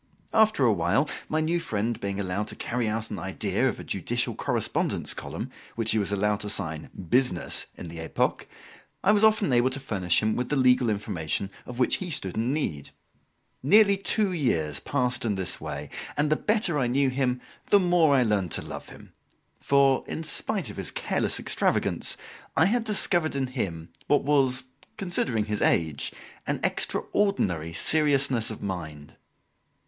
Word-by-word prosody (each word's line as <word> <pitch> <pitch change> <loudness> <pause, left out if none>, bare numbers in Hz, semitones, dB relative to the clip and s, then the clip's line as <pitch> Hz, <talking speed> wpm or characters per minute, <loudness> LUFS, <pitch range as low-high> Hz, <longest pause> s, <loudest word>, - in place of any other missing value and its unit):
After 220 - +4
a 115 - +5
while, 100 - +1 0.2
my 155 +1 +1
new 165 +2 +1
friend 115 -7 -2
being 100 0 -3
allowed 100 +2 -2
to - - -7
carry 120 -1 -2
out 110 +1 -3
an - - -4
idea - - -1
of - - -5
a - - -7
judicial - - -1
correspondence - - -1
column, - - -6 0.2
which 115 -1 +1
he 110 - +2
was 100 -1 -1
allowed 105 +1 +1
to 105 - -4
sign 80 -6 -2 0.2
"Business," 125 -8 +1
in - - -7
the 80 0 -8
"Epoque," 80 - -1 0.6
I 200 - +5
was 210 0 +3
often 215 - +4
able 120 +1 +4
to 135 +1 -3
furnish 95 -10 +1
him 110 0 +1
with 125 0 -2
the 150 - +1
legal 125 -2 +4
information 100 -2 -2 0.2
of 125 - -7
which 125 - +2
he 185 - -5
stood 95 - 0
in 115 +3 0
need. 110 - -2 0.7
Nearly 200 +7 +6
two 200 +1 +1
years 80 - 0
passed 125 -3 -1
in 110 -4 0
this 95 -2 -3
way, - - -5 0.3
and 150 +1 +1
the - - +5
better 210 -5 +1
I 125 - +1
knew 135 +2 +2
him, 125 -1 0 0.3
the 205 - +7
more 175 -6 +4
I 130 - +4
learned 100 -6 0
to - - -2
love - - -8
him; - - -14 0.5
for, 140 -1 +3
in 160 - -4
spite 190 +3 -1
of - - -12
his - - -3
careless - - -1
extravagance, - - 0 0.4
I 160 - +6
had 225 +4 +1
discovered 175 -7 +1
in 135 -1 0
him 95 -11 -4 0.2
what 145 - +3
was, 135 -3 +3 0.3
considering 135 - 0
his 105 -1 -3
age, 80 -4 +1 0.4
an - - -1
extraordinary 95 - 0
seriousness 140 - +2
of 110 - -7
mind. 80 -7 -6
125 Hz, 175 wpm, -26 LUFS, 100-155 Hz, 0.7 s, the